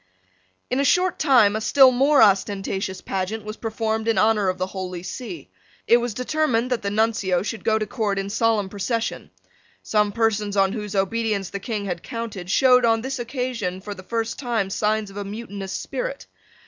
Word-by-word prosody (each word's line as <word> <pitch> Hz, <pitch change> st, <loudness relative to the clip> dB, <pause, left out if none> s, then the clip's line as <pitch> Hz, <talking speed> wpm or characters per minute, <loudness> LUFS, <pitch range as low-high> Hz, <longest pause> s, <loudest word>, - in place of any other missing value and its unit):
In 255 Hz, -, +1 dB
a -, -, +3 dB
short 360 Hz, +5 st, +2 dB
time 245 Hz, -9 st, +5 dB
a 215 Hz, -, -2 dB
still 265 Hz, +3 st, +6 dB
more 275 Hz, +1 st, +5 dB
ostentatious 195 Hz, -1 st, 0 dB
pageant 195 Hz, +3 st, -3 dB
was 215 Hz, 0 st, -5 dB
performed 220 Hz, -1 st, -2 dB
in 225 Hz, -, +2 dB
honour 215 Hz, -3 st, +3 dB
of 185 Hz, -, -2 dB
the 185 Hz, -, -1 dB
Holy 185 Hz, -2 st, -6 dB
See. 255 Hz, -, -7 dB, 0.3 s
It 235 Hz, -, +6 dB
was 240 Hz, -3 st, -3 dB
determined 255 Hz, -3 st, 0 dB
that 250 Hz, -, 0 dB
the 200 Hz, -, -2 dB
Nuncio 205 Hz, -4 st, +1 dB
should 220 Hz, +1 st, -5 dB
go 220 Hz, -1 st, +2 dB
to 215 Hz, -, -1 dB
court 210 Hz, -2 st, -2 dB
in 195 Hz, 0 st, -3 dB
solemn 220 Hz, -2 st, +1 dB
procession. 225 Hz, +4 st, -3 dB, 0.5 s
Some 210 Hz, -1 st, +1 dB
persons 210 Hz, -2 st, 0 dB
on 195 Hz, 0 st, +3 dB
whose 210 Hz, -3 st, -5 dB
obedience 200 Hz, 0 st, 0 dB
the 200 Hz, -, -4 dB
King 205 Hz, 0 st, -4 dB
had 175 Hz, -3 st, -3 dB
counted 215 Hz, -6 st, -6 dB
showed, 250 Hz, +3 st, +5 dB
on 225 Hz, -1 st, +3 dB
this 265 Hz, +2 st, -4 dB
occasion, 240 Hz, -7 st, -3 dB
for 205 Hz, +2 st, -7 dB
the 185 Hz, -, -11 dB
first 225 Hz, +5 st, -3 dB
time, 230 Hz, -7 st, -1 dB
signs 210 Hz, 0 st, 0 dB
of 195 Hz, -, -11 dB
a 205 Hz, -, -3 dB
mutinous 200 Hz, -2 st, -6 dB
spirit. -, -, -4 dB
220 Hz, 185 wpm, -23 LUFS, 200-235 Hz, 0.5 s, still